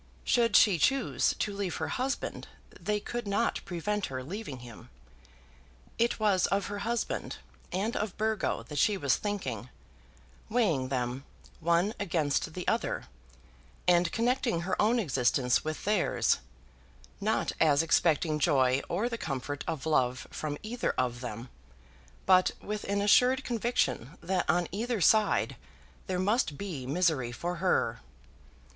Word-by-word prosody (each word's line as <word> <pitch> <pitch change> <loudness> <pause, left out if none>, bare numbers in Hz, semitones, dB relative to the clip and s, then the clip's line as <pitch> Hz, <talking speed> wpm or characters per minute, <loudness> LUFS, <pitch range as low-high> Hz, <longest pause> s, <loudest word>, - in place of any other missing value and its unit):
Should 230 -3 +2
she 195 -6 +6
choose 270 - +2
to 210 - -1
leave 195 -4 -2
her - - -3
husband, 265 +2 -3 0.3
they 210 0 -1
could 240 +1 -5
not 205 +4 0
prevent 200 +4 -2
her 130 -1 -5
leaving 165 - -6
him. 120 -3 -12 1.1
It 235 0 +2
was 200 -4 +3
of 195 -1 0
her 205 - -4
husband 230 +3 -2 0.3
and 205 +5 -1
of 210 -3 -3
Burgo 215 - 0
that 145 +4 -5
she 210 +5 +3
was 140 -6 +2
thinking, 135 - -4 0.8
weighing 200 - +1
them 130 0 -2 0.4
one 170 +5 +2
against 160 -4 0
the 180 - -5
other, - - -1 0.8
and 175 -1 +4
connecting 235 -5 +1
her 185 +2 -1
own 225 +4 +3
existence 130 - +2
with 155 0 -4
theirs, 205 -3 +2 0.8
not - - 0
as 150 -1 +4
expecting 160 -1 +2
joy 130 -2 +3
or 200 +7 0
the 230 -1 -4
comfort 145 0 -4
of 160 -4 -3
love 130 -5 +1
from 150 -1 -4
either 235 +3 -2
of 125 -1 -1
them, 120 0 -6 0.8
but 185 -1 +5
with 210 0 -5
an 200 0 0
assured 250 +6 +5
conviction 230 - -1
that 180 +1 -1
on 175 -1 +2
either 230 +4 -2
side 215 +5 +3 0.5
there 185 -2 -1
must 185 - +1
be 160 -11 -5
misery 145 -5 +1
for 175 +8 -4
her. 180 +2 +1
180 Hz, 140 wpm, -30 LUFS, 145-210 Hz, 1.1 s, she